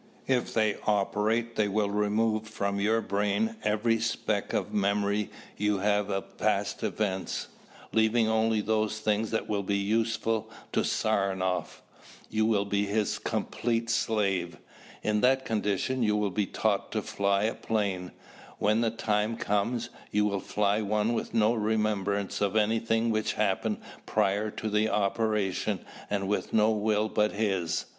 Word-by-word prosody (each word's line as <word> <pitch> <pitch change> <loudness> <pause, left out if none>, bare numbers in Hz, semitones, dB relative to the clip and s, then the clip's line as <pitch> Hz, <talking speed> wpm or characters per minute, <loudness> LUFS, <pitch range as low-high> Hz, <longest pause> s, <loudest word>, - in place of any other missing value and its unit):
If 130 -2 +1
they 110 -2 +2
operate 110 +3 +1
they 105 - +3
will 100 0 0
remove 110 +1 +1
from 100 -2 -2
your 110 +3 +2
brain 105 - 0
every 115 +2 +2
speck 110 -2 -1
of 105 - -2
memory 100 0 +1 0.3
you 105 0 +1
have 105 +1 +1
of 95 -1 -4
past - - 0
events, 95 -3 -2 0.4
leaving 110 +1 +3
only 110 0 +2
those 110 0 0
things 110 0 0
that 110 - -1
will 105 -1 0
be 100 +1 0
useful 110 +2 0 0.2
to - - +1
Saranoff. 95 -5 0 0.5
You 110 0 +2
will 105 -3 +2
be 100 0 0
his 105 +1 0
complete 115 0 -1
slave. 95 -8 0 0.5
In 105 0 +1
that 130 +1 +3
condition 110 +4 0
you 105 -2 +2
will 105 -2 0
be 100 +1 0
taught - - 0
to - - -1
fly 100 0 +1
a 110 - +1
plane. 100 -5 -2 0.5
When 105 +2 +2
the 115 - +2
time 110 0 0
comes, 105 +4 -1 0.2
you 105 0 +2
will 100 -1 0
fly 105 +2 0
one 105 +2 +1
with - - -2
no 110 +1 +4
remembrance 105 -3 0
of 100 0 +1
anything 115 +1 +2
which 110 -1 0
happened 105 +1 0 0.3
prior 105 0 +1
to 110 - -5
the 105 +1 +2
operation 105 -1 0 0.2
and 100 -1 -1
with 105 - -1
no 110 0 +4
will 105 0 +1
but 105 -1 +1
his. 95 -6 0
105 Hz, 150 wpm, -28 LUFS, 100-110 Hz, 0.5 s, no